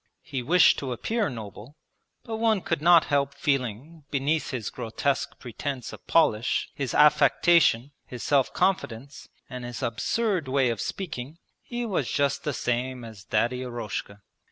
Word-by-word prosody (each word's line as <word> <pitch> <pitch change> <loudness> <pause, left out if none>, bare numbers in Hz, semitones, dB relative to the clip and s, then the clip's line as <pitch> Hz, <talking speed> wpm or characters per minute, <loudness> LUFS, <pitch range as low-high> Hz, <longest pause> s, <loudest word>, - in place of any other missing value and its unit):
He 140 -6 -4
wished 165 +6 +5
to 130 -3 -3
appear 220 - -1
noble, 115 +3 -9 0.5
but 225 -1 -5
one 220 -3 +2
could 165 -3 -2
not 170 0 +6
help 140 -1 +1
feeling 140 +3 -2
beneath 145 +3 0
his 120 -6 -4
grotesque 125 +3 -2
pretence 125 0 -5
of - - -13
polish, 120 -8 +2
his 135 -4 -3
affectation, 150 -2 +4 0.2
his 125 -2 -7
self 140 -3 +2
confidence, 140 -7 -2 0.2
and 125 -1 -7
his 120 +2 -6
absurd 170 - 0
way 130 -2 +2
of 115 - -4
speaking, 155 -5 -5 0.2
he 240 0 -4
was 185 - -1
just 140 -1 0
the 150 - -1
same 125 +1 -2
as 110 -3 -11
Daddy 120 +4 0
Eroshka. 115 -4 -5
135 Hz, 150 wpm, -26 LUFS, 120-160 Hz, 0.5 s, not